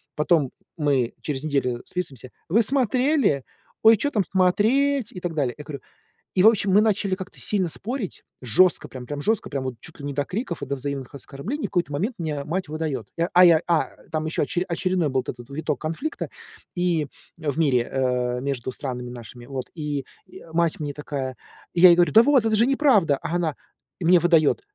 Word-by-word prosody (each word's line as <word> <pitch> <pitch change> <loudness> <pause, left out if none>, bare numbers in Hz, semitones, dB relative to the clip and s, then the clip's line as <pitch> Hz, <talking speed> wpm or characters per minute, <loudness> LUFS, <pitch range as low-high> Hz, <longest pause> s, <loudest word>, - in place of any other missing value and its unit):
Потом 150 -3 +2 0.2
мы 140 -6 +1
через 140 -2 -3
неделю 135 -5 -1
списываемся: 140 -9 -5 0.2
"Вы 215 +8 +4
смотрели?" 255 - +2 0.4
"Ой, 225 +1 +8
чё 285 +7 -1
там 210 -6 +1
смотреть?" 225 +8 +2
И 180 - -6
так 175 -2 -3
далее. 140 -6 -1
Я 150 - -8
говорю 145 -2 -7 0.6
И, 185 - +4
в - - +9
общем, 210 -3 +3
мы 195 - +6
начали 205 -3 +1
как-то 190 +1 -10
сильно 195 -4 0
спорить, 225 - -5 0.2
жестко 130 - +3
прям, 130 -2 -9
прям 145 +3 -5
жестко, 220 +6 0
прям 135 -2 -3
вот 130 -1 -3
чуть 165 - -14
ли 140 - -7
не 145 - -3
до 145 +1 0
криков 185 - -4
и - - -2
до 140 - -2
взаимных 140 -1 -5
оскорблений. 145 - -6
В - - -20
какой-то 175 -4 0
момент 200 - -2
мне 150 -4 -3
мать 180 +1 -3
выдает. 150 -8 -3
Я 170 +1 0
а 180 - +8
я 165 -2 +6
а, 170 -2 +2 0.2
там 155 -1 -1
еще 155 - 0
очере 175 +5 -1
очередной 175 -2 0
был 130 -1 +1
этот 120 0 -8
виток 150 -1 -3
конфликта 165 - -4 0.5
и 175 -4 +1 0.3
в 155 -2 -3
мире, 130 -7 +2
э, 125 -2 0
между 130 -2 -3
странами 125 -1 -5
нашими. 120 0 -10
Вот, 130 -2 -4
и, 145 -4 -3 0.3
э, 165 - -13
мать 170 -1 +1
мне 145 -2 -3
такая. 140 -3 -4 0.4
Я 180 +1 +8
ей 170 - +7
говорю: 175 0 +3
"Да 225 - +8
вот, 265 -3 +4
это 220 -1 +2
же 225 +2 +4
неправда!" 255 - +3
А 165 +1 -3
она 165 -4 0 0.4
мне 175 0 +5
выдает: 165 - +3
160 Hz, 200 wpm, -24 LUFS, 140-190 Hz, 0.6 s, в